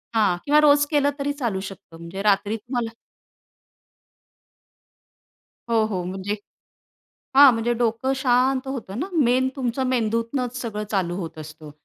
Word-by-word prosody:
हां. 200 -5 +3
किंवा 295 +1 +5
रोज 290 -1 +5
केलं 285 -1 +3
तरी 280 +1 -1
चालू 215 -6 -1
शकतं 170 -3 -14
म्हणजे 170 +4 -7
रात्री 205 +1 +2
तुम्हाला 235 +1 -4 2.8
हो, 225 -1 +3
हो, 190 -5 -3
म्हणजे 190 +3 -4 1.0
हां, 280 -1 +9
म्हणजे 230 +1 0
डोकं 235 +3 0
शांत 260 +1 +2
होतं 235 -6 -5
ना. 355 - -2
मेन 260 -4 +2
तुमचं 260 0 -1
मेंदूतनंच 235 +1 -1
सगळं 215 -3 -4
चालू 185 -4 0
होत 165 -4 -6
असतं. 155 0 -10
230 Hz, 130 wpm, -23 LUFS, 195-260 Hz, 2.8 s, हां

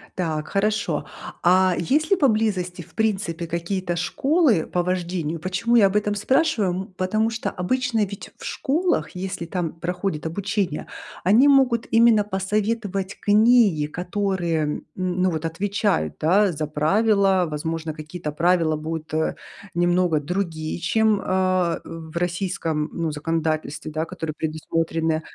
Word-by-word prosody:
Так, 155 -4 -2
хорошо. 210 +2 0 0.4
А, 185 +1 +4
есть 300 - +1
ли 390 - +4
поблизости, 215 - +1
в - - -16
принципе, 190 -6 -1
какие-то 175 +2 -2
школы 265 - +2
по 180 - -1
вождению? 175 -3 -2
Почему 190 +8 0
я 220 -4 +7
об 195 - -4
этом 210 0 +1
спрашиваю? 250 - +2
М, 190 +1 -5
потому 215 +4 +1
что, 225 -1 -3
обычно, 250 +5 -1
ведь, 200 -2 -3
в - - -13
школах, 340 +6 0
если 185 -1 -4
там 170 -1 -3
проходит 180 -1 -3
обучение, 190 -1 -2 0.4
они 220 +10 +5
могут 260 -5 +4
именно 230 -2 +5
посоветовать 200 0 -2
книги, 210 -6 +4
которые, 180 +2 -2
м, 150 0 -2
ну, 185 0 0
вот 160 -2 -3
отвечают, 185 - 0
да, 190 +5 +3
за 155 -1 -3
правила. 195 +4 +2
Возможно, 160 +1 -3
какие-то 155 0 -6
правила 165 0 +2
будут, 155 0 -5
э, 160 0 0 0.4
немного 175 -2 +2
другие, 160 0 -3
чем, 215 +2 +2
а, 185 -2 +1
в 165 0 -8
российском, 170 -3 -1
ну, 165 -2 -2
законодательстве, 155 0 -2
да, 155 +1 -2
которые 160 -1 -5
предусмотрены. 160 0 -1
180 Hz, 135 wpm, -23 LUFS, 165-205 Hz, 0.4 s, я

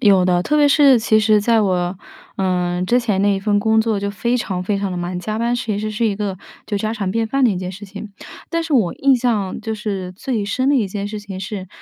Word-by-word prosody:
有 195 -3 +5
的， 180 -1 +2
特 300 +10 0
别 295 -1 +5
是 280 -3 +6
其 220 -1 +3
实 215 0 +4
在 225 +1 +3
我， 180 -2 0 0.4
嗯， 180 -1 0
之 245 +5 +3
前 215 -6 0
那 200 0 +3
一 - - -1
份 205 +1 +1
工 220 +1 +2
作 220 -2 0
就 200 0 -2
非 235 +5 -1
常 185 -6 -3
非 200 +1 -1
常 200 -1 -2
地 180 - -4
忙， 175 +1 -3
加 215 +3 -3
班 235 +1 0
其 220 -4 -2
实 215 +1 -3
是 215 +2 0
一 205 -2 -1
个 200 -2 -3 0.3
就 205 - -2
家 220 +2 -2
常 200 -4 -2
便 225 +2 0
饭 275 +3 +1
的 235 - +5
一 195 - -2
件 180 0 -4
事 195 +3 -9
情。 205 +1 -9 0.4
但 335 0 -1
是 325 -1 -5
我 220 -11 +2
印 275 0 +3
象 230 -7 -1
就 220 0 -3
是 195 -4 -4
最 215 +2 -3
深 255 +6 0
的 - - +3
一 215 -6 +1
件 200 +1 -4
事 210 0 -5
情 200 -2 -8
是 195 -1 -6
205 Hz, 285 characters per minute, -19 LUFS, 190-230 Hz, 0.4 s, 是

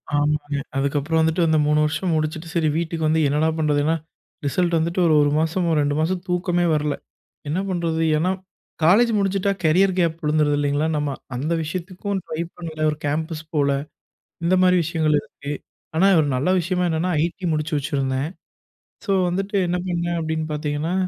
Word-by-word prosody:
ஆமாங்க. 145 0 0 0.2
அதுக்கப்புறம் 145 +3 0
வந்துட்டு 160 +2 +1
அந்த 160 0 +3
3 150 0 +3
வருஷம் 165 +3 -1
முடிச்சுட்டு, 155 +1 -2
சரி 160 -2 +2
வீட்டுக்கு 165 -1 -2
வந்து 160 +1 +2
என்னடா 150 +3 +2
பண்ணுறதுனா 150 0 +2 0.5
ரிசல்ட் 175 +4 +1
வந்துட்டு 170 +3 -1
ஒரு 160 - +4
1 145 - +3
மாசமோ 165 +1 +1
2 145 0 0
மாசம் 175 +3 0
தூக்கமே 175 0 +1
வரல. 150 -1 0 0.5
என்ன 160 +5 0
பண்ணுறது? 170 -3 -1 0.2
ஏன்னா 175 +4 +1 0.5
காலேஜ் 215 +9 +5
முடிஞ்சிட்டா 195 0 +1
கேரியர் 185 +5 +4
கேப் 165 -2 +1
விழுந்துடுது 150 -1 +2
இல்லங்களா, 145 +2 +1
நம்ம 145 -1 -1 0.3
அந்த 150 +7 -1
விஷயத்துக்கும் 185 +4 -4
ட்ரை 155 - -3 0.2
பண்ணல 160 -3 -3
ஒரு 150 - -3
கேம்பஸ் 155 +2 -2
போல. 140 -2 +3 0.7
இந்த 175 +2 +3
மாதிரி 185 0 +5
விஷயங்கள் 155 -1 +1
இருக்கு. 140 0 -8 0.4
ஆனா 185 +5 +4
ஒரு 150 - +2
நல்ல 135 +7 0
விஷயமா 180 +1 -1
என்னன்னா 165 +3 0
ஐடி 175 +2 -3
முடிச்சு 155 +1 -2
வச்சிருந்தேன். 135 0 -1 0.8
ஸோ 200 - +1 0.2
வந்துட்டு 195 +3 -2
என்ன 175 - 0
பண்ணேன், 170 -1 -1
அப்படின்னு 160 0 -2
பாத்தீங்கன்னா, 150 +3 -2
160 Hz, 160 wpm, -22 LUFS, 150-175 Hz, 0.8 s, காலேஜ்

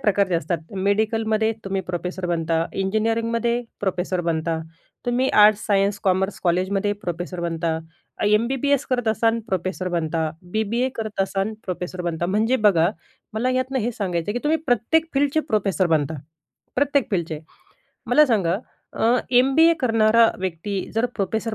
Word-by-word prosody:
प्रकारचे 200 -5 +2
असतात. 170 +1 -1 0.3
मेडिकलमध्ये 220 +1 +1
तुम्ही 195 0 -1
प्रोफेसर 180 +1 -3
बनता, 165 -1 0
इंजिनिअरिंगमध्ये 230 +4 0 0.2
प्रोफेसर 185 -2 -1
बनता, 165 -1 -1 0.5
तुम्ही 250 +2 +1 0.2
आर्ट्स, 215 0 +4
सायन्स, 200 -1 +2
कॉमर्स 190 +1 +1
कॉलेजमध्ये 190 +4 +1
प्रोफेसर 175 +1 -4
बनता, 165 -1 -1 0.5
एम-बी-बी-एस 255 +6 +2
करत 245 -3 +1
असाल 225 +1 +2
प्रोफेसर 185 0 -2
बनता, 160 -1 -1 0.2
बी-बी-ए 220 +4 0
करत 215 -3 -4
असाल, 195 +2 -2
प्रोफेसर 180 0 -4
बनता. 170 -1 -2
म्हणजे 220 +7 +2
बघा, 170 -3 +3 0.5
मला 245 +4 0
यातून 255 +1 0
हे 235 +2 -1
सांगायचं 180 -4 -2
आहे 210 - -3
की - - -14
तुम्ही 315 +2 +2
प्रत्येक 275 +7 +2
फील्डचे 285 +3 +2
प्रोफेसर 195 -4 +1
बनता. 150 0 0 0.6
प्रत्येक 280 0 +1
फील्डचे. 165 -5 -2 0.7
मला 300 +6 +5
सांगा 195 -7 +1 0.8
एम-बी-ए 315 +6 +5
करणारा 225 -2 +4
व्यक्ती 190 +2 -3
जर 225 +2 +2
प्रोफेसर 220 +3 -2
205 Hz, 135 wpm, -23 LUFS, 180-230 Hz, 0.8 s, मला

